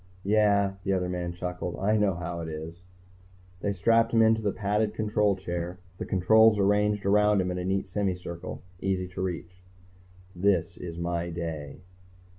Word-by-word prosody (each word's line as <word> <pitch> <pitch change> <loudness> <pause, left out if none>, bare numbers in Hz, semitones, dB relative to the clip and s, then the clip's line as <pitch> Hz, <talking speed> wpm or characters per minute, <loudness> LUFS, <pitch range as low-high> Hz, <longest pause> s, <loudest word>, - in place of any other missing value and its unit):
"Yeah," 100 -1 +3
the 95 - 0
other 90 -1 0
man 90 -1 -3
chuckled. 90 0 -4
"I 105 +3 +1
know 105 -4 +2
how 85 0 -5
it 80 - -5
is." 80 +2 -7 0.8
They 100 - -1
strapped 115 +4 +3
him 115 -1 +5
into 110 0 +4
the 105 -2 0
padded 105 +1 -1
control 105 -2 +1
chair, 90 -1 -4 0.2
the - - -4
controls 110 +4 +5
arranged 105 +1 +2
around 105 +1 +4
him 90 -1 0
in 90 - -3
a 90 - -3
neat 95 +1 -1
semicircle, 90 -3 -4 0.2
easy 95 -1 -1
to 90 - -6
reach. 90 0 -5 0.7
_This 90 -1 +1
is 85 -2 -6
my 85 0 -2
day. 80 -2 -5
95 Hz, 165 wpm, -27 LUFS, 90-105 Hz, 0.8 s, him